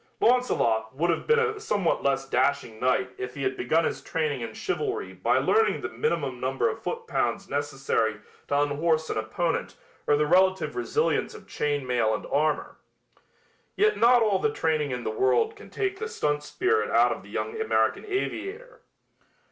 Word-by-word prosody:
Launcelot 125 Hz, -, +2 dB
would 170 Hz, +5 st, +1 dB
have 165 Hz, -, -3 dB
been 460 Hz, 0 st, +5 dB
a 450 Hz, -2 st, 0 dB
somewhat 205 Hz, -, 0 dB
less 135 Hz, -1 st, 0 dB
dashing 130 Hz, -3 st, 0 dB
knight 125 Hz, 0 st, +1 dB
if 125 Hz, 0 st, -5 dB
he 140 Hz, -, -4 dB
had 130 Hz, 0 st, 0 dB
begun 160 Hz, +8 st, +1 dB
his -, -, -2 dB
training 150 Hz, -5 st, -2 dB
in 115 Hz, -, -4 dB
chivalry 415 Hz, +2 st, -3 dB
by -, -, +1 dB
learning 445 Hz, +1 st, +2 dB
the -, -, -3 dB
minimum 460 Hz, +1 st, -2 dB
number -, -, 0 dB
of 450 Hz, -, -3 dB
foot 465 Hz, 0 st, -4 dB
pounds 200 Hz, -, -1 dB
necessary 135 Hz, -6 st, -1 dB, 0.3 s
to 145 Hz, -, +1 dB
unhorse 155 Hz, +2 st, +1 dB
an -, -, -2 dB
opponent 135 Hz, +10 st, -2 dB, 0.3 s
or 145 Hz, -, +5 dB
the 150 Hz, -, +2 dB
relative 185 Hz, +4 st, +3 dB
resilience 440 Hz, +5 st, 0 dB
of -, -, -13 dB
chain 145 Hz, -2 st, -1 dB
mail 120 Hz, -3 st, +1 dB
and -, -, -6 dB
armor. 150 Hz, +1 st, 0 dB, 1.0 s
Yet 425 Hz, +1 st, +3 dB
not 240 Hz, 0 st, +5 dB
all 205 Hz, -3 st, +2 dB
the 220 Hz, -, +1 dB
training 155 Hz, -6 st, 0 dB
in 125 Hz, -2 st, -4 dB
the 110 Hz, -, -2 dB
world 125 Hz, +2 st, +2 dB
can -, -, -13 dB
take 390 Hz, -1 st, -2 dB
the 445 Hz, -, -3 dB
stunt 150 Hz, -, -1 dB
spirit 370 Hz, -, 0 dB
out -, -, +4 dB
of -, -, -4 dB
the -, -, -15 dB
young 445 Hz, 0 st, -3 dB
American 445 Hz, -, +1 dB
aviator. 420 Hz, +4 st, -4 dB
160 Hz, 180 wpm, -26 LUFS, -, 1.0 s, been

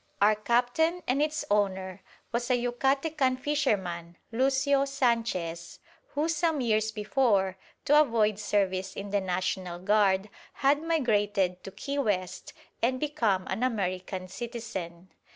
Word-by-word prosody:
Our 210 Hz, +2 st, +5 dB
captain 245 Hz, +11 st, +1 dB
and 265 Hz, +3 st, +1 dB
its 305 Hz, 0 st, -1 dB
owner 190 Hz, -2 st, 0 dB, 0.3 s
was 240 Hz, +1 st, -2 dB
a 250 Hz, -, +4 dB
Yucatecan 265 Hz, +3 st, +1 dB
fisherman, 190 Hz, -, -1 dB
Lucio 270 Hz, +3 st, +2 dB
Sanchez, 230 Hz, -, -1 dB, 0.4 s
who 300 Hz, +2 st, +1 dB
some 325 Hz, -1 st, +1 dB
years 220 Hz, -3 st, +1 dB
before, 210 Hz, -4 st, +1 dB, 0.3 s
to 295 Hz, +1 st, +6 dB
avoid 220 Hz, -7 st, +2 dB
service 190 Hz, -2 st, 0 dB
in 200 Hz, 0 st, -6 dB
the 200 Hz, -1 st, +1 dB
National 185 Hz, -1 st, -2 dB
Guard, 200 Hz, +1 st, +2 dB, 0.2 s
had 285 Hz, +2 st, +2 dB
migrated 205 Hz, -, +1 dB
to -, -, -5 dB
Key 275 Hz, +9 st, -4 dB
West 195 Hz, -8 st, -2 dB, 0.3 s
and 255 Hz, +2 st, +1 dB
become 230 Hz, -11 st, 0 dB
an -, -, -3 dB
American 185 Hz, -5 st, -2 dB
citizen. 190 Hz, -5 st, -6 dB
220 Hz, 125 wpm, -28 LUFS, 190-270 Hz, 0.4 s, to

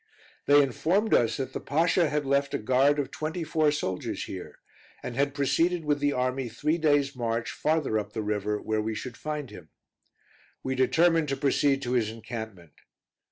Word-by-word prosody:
They 145 Hz, 0 st, +7 dB
informed 190 Hz, +10 st, 0 dB
us 115 Hz, -2 st, +3 dB
that 135 Hz, -, -4 dB
the -, -, -3 dB
Pasha 165 Hz, +3 st, +2 dB
had 150 Hz, 0 st, -1 dB
left 140 Hz, +1 st, +1 dB
a -, -, +2 dB
guard 130 Hz, +6 st, +3 dB
of 145 Hz, -2 st, -2 dB
twenty 160 Hz, +3 st, -4 dB
four 155 Hz, -1 st, +2 dB
soldiers 95 Hz, -11 st, -3 dB
here, -, -, -8 dB, 0.5 s
and 120 Hz, -, -5 dB
had 140 Hz, +1 st, 0 dB
proceeded 165 Hz, +4 st, +1 dB
with 145 Hz, -1 st, +1 dB
the 145 Hz, 0 st, +1 dB
army 130 Hz, -1 st, -1 dB
three 150 Hz, +8 st, -1 dB
days' 145 Hz, -3 st, +2 dB
march 115 Hz, -1 st, -2 dB
farther 155 Hz, -8 st, 0 dB
up 105 Hz, 0 st, -7 dB
the 110 Hz, -, -3 dB
river, 105 Hz, 0 st, -1 dB
where 110 Hz, 0 st, -1 dB
we 110 Hz, +1 st, -3 dB
should 120 Hz, +2 st, -6 dB
find 150 Hz, -5 st, -5 dB
him. 90 Hz, -6 st, -12 dB, 0.9 s
We 130 Hz, -, -1 dB
determined 160 Hz, +4 st, +3 dB
to 135 Hz, -, -1 dB
proceed 140 Hz, 0 st, +2 dB
to 120 Hz, -, -3 dB
his 120 Hz, -4 st, +1 dB
encampment. 110 Hz, -, -8 dB
135 Hz, 180 wpm, -27 LUFS, 115-150 Hz, 0.9 s, They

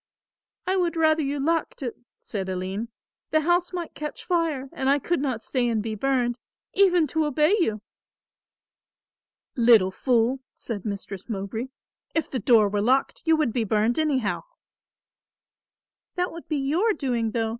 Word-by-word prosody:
"I 375 Hz, +1 st, +1 dB
would 345 Hz, -2 st, +1 dB
rather 315 Hz, -1 st, +3 dB
you 285 Hz, 0 st, -2 dB
locked 320 Hz, 0 st, -1 dB
it," 240 Hz, -, -3 dB, 0.2 s
said 190 Hz, -3 st, -4 dB
Aline. 190 Hz, +4 st, -3 dB, 0.4 s
"The 310 Hz, -, +3 dB
house 350 Hz, +3 st, +2 dB
might 350 Hz, -2 st, -5 dB
catch 300 Hz, -1 st, -6 dB
fire 325 Hz, -6 st, 0 dB
and 265 Hz, -, 0 dB
I 280 Hz, -, +5 dB
could 340 Hz, +4 st, -1 dB
not 255 Hz, -5 st, -2 dB
stay 250 Hz, -3 st, 0 dB
and 220 Hz, -2 st, 0 dB
be 220 Hz, -1 st, -3 dB
burned, 245 Hz, +1 st, 0 dB, 0.3 s
even 360 Hz, -4 st, +4 dB
to 315 Hz, +2 st, 0 dB
obey 300 Hz, +5 st, +3 dB
you." 215 Hz, -, 0 dB, 1.7 s
"Little 230 Hz, -6 st, +5 dB
fool," 245 Hz, +4 st, +1 dB, 0.2 s
said 210 Hz, -5 st, -5 dB
Mistress 200 Hz, -1 st, -6 dB
Mowbray, 215 Hz, +3 st, -3 dB, 0.5 s
"if 325 Hz, -, 0 dB
the 260 Hz, -, -1 dB
door 220 Hz, -1 st, +5 dB
were 205 Hz, 0 st, -1 dB
locked 260 Hz, +5 st, +1 dB
you 325 Hz, -1 st, +5 dB
would 300 Hz, -8 st, 0 dB
be 240 Hz, -, +1 dB
burned 220 Hz, +5 st, +1 dB
anyhow." 270 Hz, -9 st, 0 dB, 1.7 s
"That 360 Hz, 0 st, -1 dB
would 335 Hz, -, -10 dB
be 305 Hz, -, -1 dB
your 325 Hz, +11 st, +2 dB
doing, 245 Hz, -, -1 dB
though. 225 Hz, 0 st, -1 dB
265 Hz, 155 wpm, -25 LUFS, 225-315 Hz, 1.7 s, I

